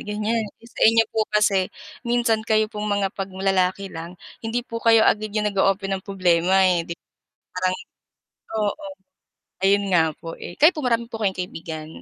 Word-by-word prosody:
ganyan 215 +2 -1 0.2
sa 230 - -13
inyo 225 0 +5
po 220 - 0
kasi 195 -3 +3 0.4
minsan 235 -2 +2
kayo 215 0 +2
pong 210 -1 -4
mga 200 -1 0
'pag 195 - -2
lalaki 190 0 0
lang 165 +2 -7 0.3
hindi 225 +2 -1
po 230 -2 -6
kayo 225 -1 +6
agad 215 0 +2
'yong 210 -1 +1
nag-o-open 195 0 +1
ng - - -18
problema 185 -1 +3
eh, 175 -2 +1
'di 170 - -5 0.6
parang 185 0 +1 0.9
oo, 295 +9 -2 0.8
ayon 200 +1 +4
nga 170 -2 +5 0.2
po 165 0 -7
eh, 175 - -8
kayo 310 +4 +7
po 305 - -4
marami 235 -1 +1
po 225 - -6
kayong 195 -2 +1
kaibigan? 160 -3 -6
200 Hz, 170 wpm, -23 LUFS, 185-220 Hz, 0.9 s, kayo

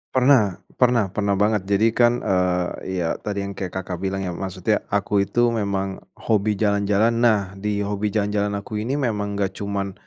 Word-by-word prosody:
Pernah, 125 -7 +4 0.2
pernah 120 -6 +3
pernah 100 0 0
banget. 105 +1 +2
Jadi 100 +2 +3
kan, 120 +1 +4
eee, 90 0 0
ya - - 0
tadi 100 -1 -3
yang 100 - -4
kayak 95 -3 -4
Kakak 95 -2 -4
bilang 95 +1 -2
ya, 90 - -3
maksudnya 95 +3 -1
aku 100 0 0
itu 120 0 +2
memang 100 -3 -2 0.2
hobi 105 -1 0
jalan-jalan. 100 +1 +2
Nah, 105 -5 +2
di 105 0 -1
hobi 100 +1 -1
jalan-jalan 105 -1 0
aku 105 +1 -4
ini 120 +6 -2
memang 105 -7 -1
enggak 100 -1 0
cuma, 100 -1 -2
100 Hz, 175 wpm, -22 LUFS, 95-110 Hz, 0.2 s, Pernah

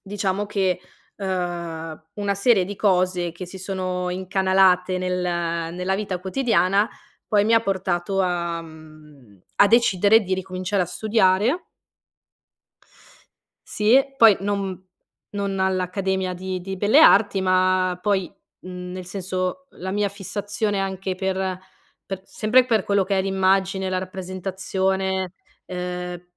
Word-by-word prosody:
diciamo 200 0 -2
che, 190 -3 0 0.4
ehm, 170 -4 -4
una 205 -1 -1
serie 200 -2 +3
di 205 +2 -6
cose 180 -3 +1
che 175 +2 -7
si 190 +2 -9
sono 185 -1 -3
incanalate 185 0 +2
nel 180 0 -1 0.5
nella 180 +1 -1
vita 195 -3 -3
quotidiana 200 -1 +2 0.4
poi 205 -1 +3
mi 225 - +2
ha 225 - +5
portato 195 -2 -1
a 170 -2 -2
mhmm, 155 - -16 0.2
a 200 - +7
decidere 220 -2 +5
di 190 -2 -4
ricominciare 185 +1 -2
a 175 - -3
studiare 215 - +1 2.0
sì, 220 +5 +4 0.2
poi 225 -6 +7
non 195 -2 -2 0.5
non 200 -1 -2
all'accademia 190 0 -1
di 185 0 -4
di 190 +1 -6
belle 215 +10 +4
arti 200 -7 +5
ma 185 -1 +2
poi, 195 -2 0 0.3
mhmm, 180 0 -8
nel 185 0 -6
senso, 185 +7 -3
la 190 +1 -7
mia 205 +1 0
fissazione 205 +1 -3
anche 190 -1 -3
per 190 -1 -2 0.5
per 190 -1 -5
sempre 235 +4 +3
per 225 -5 +1
quello 200 -1 +2
che 195 +1 -1
è - - +3
l'immagine, 190 0 +1
la 185 - -1
rappresentazione, 190 0 -2 0.3
ehm, 180 -1 -5
190 Hz, 125 wpm, -23 LUFS, 180-200 Hz, 2.0 s, a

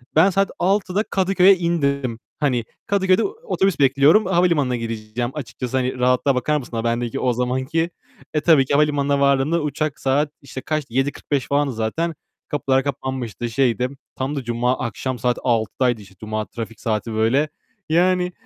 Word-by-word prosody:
Ben 175 +5 +6
saat 195 +1 +1
18.00'da 195 +1 +1
Kadıköy'e 190 -1 +4
indim. 140 -9 -1 0.2
Hani, 125 -6 +1 0.2
Kadıköy'de 190 -2 +3
otobüs 400 - -1
bekliyorum. 140 +9 +5
Havalimanına 170 -8 +2
gideceğim 115 +1 -4
açıkçası. 130 -2 -4
Hani, 130 0 -1
rahatlığa 125 +2 +2
bakar 150 +4 +1
mısın 125 -3 -7
a 115 - -2
bendeki 120 0 -1
o 125 -1 +1
zamanki? 130 +7 -1 0.4
E, 150 - +1
tabii 155 -6 +5
ki 140 - -2
havalimanına 145 -1 +2
vardığımda 140 +4 +2
uçak 150 0 -2
saat 145 +3 +1
işte 135 -1 -8
kaçtı, 150 -6 -3
19.45 135 0 -1
falandı 140 -2 +1
zaten. 150 +10 -2 0.3
Kapılar 135 -2 +1
kapanmıştı, 130 -4 -4
şeydi. 125 +1 +1 0.3
Tam 135 +3 -3
da 135 - -3
cuma 120 +2 0
akşam 125 +2 -3
saat 125 +1 +1
18.00'daydı, 120 0 +1
işte, 95 -1 -16
cuma 110 0 -3
trafik 115 -2 -7
saati 110 0 -2
böyle. 125 +8 +2 0.4
Yani, 180 +2 +2
135 Hz, 155 wpm, -21 LUFS, 120-155 Hz, 0.4 s, Ben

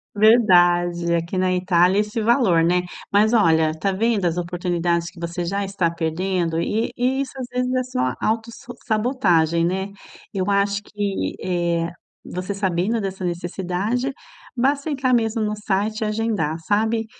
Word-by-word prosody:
Verdade. 175 -6 +4
Aqui 170 +3 -2
na 185 0 +2
Itália, 180 +1 +3
é - - +5
esse 210 +2 -3
valor, 220 -7 +3
né? 180 +1 +2 0.3
Mas 210 +2 +4
olha, 160 -8 +4
tá 195 +4 0
vendo 220 -1 +1
as 170 -1 +1
oportunidades 175 -1 -1
que 180 - -16
você 170 +1 -4
já 200 +3 -1
está 195 -3 0
perdendo 170 +1 -1
e 215 +7 -1
e 260 +2 +1
isso 275 - -4
às 255 - -5
vezes 250 0 -1
é 255 0 +1
só 130 - -1
auto 225 +1 -1
s - - -13 0.2
sabotagem, 195 - +2
né? 190 +3 -1 0.5
Eu 195 0 -1
acho 200 0 +1
que 205 -1 -3
eh, 170 -2 0 0.4
você 185 +3 -4
sabendo 195 +3 0
dessa 190 -2 -4
necessidade, 180 +8 -2 0.4
basta 280 +4 +1
entrar 265 -3 0
mesmo 225 -1 +1
no 210 0 -1
site 210 +2 -1
e 220 - +1
agendar, 210 -8 -1
sabe? 220 +2 +1
195 Hz, 160 wpm, -22 LUFS, 175-220 Hz, 0.5 s, é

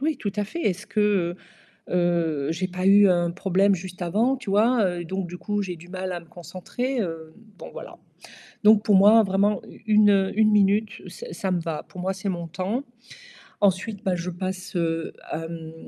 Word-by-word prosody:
Oui, 305 +1 0
tout 205 -5 -4
à 210 - 0
fait. 335 +12 -6
Est-ce 195 0 -1
que, 200 -5 +1 0.5
heu, - - -2
heu, 170 -5 +1
j'ai 180 +3 -2
pas 185 +1 -3
eu 200 0 +7
un 175 -2 +2
problème 195 +2 +2
juste 185 0 -8
avant, 220 +10 +1
tu 235 -6 -7
vois? 225 +4 +3
Heu, 175 -2 -2
donc 190 +1 -4
du 180 - -7
coup, 205 +1 -2
j'ai 180 -3 -5
du 170 +2 -15
mal 185 0 -4
à 175 - -4
me - - -17
concentrer, 185 +10 -5
hem, 215 -7 0 0.5
bon - - -9
voilà. - - -10 0.7
Donc 210 0 +6
pour 210 - +4
moi, 210 +4 +7
vraiment, 200 +1 +1
u - - -15
une, 210 -1 +5
heu, 195 -1 +2
1 215 -1 +4
minute, 210 +1 +2
ça 480 - -9
ça 190 - -3
me 180 - +1
va. 165 -2 -4
Pour 180 - -10
moi, 190 +1 -1
c'est 195 +1 -4
mon 170 -2 -4
temps. 190 - -3 0.8
Ensuite, 200 +2 +1
bah, 190 -3 +1
je 175 +1 -4
passe, 185 +1 -5
heu, 165 -1 -1
à, 165 +1 -5
mmh, 165 -1 -8
190 Hz, 210 wpm, -24 LUFS, 175-210 Hz, 0.8 s, eu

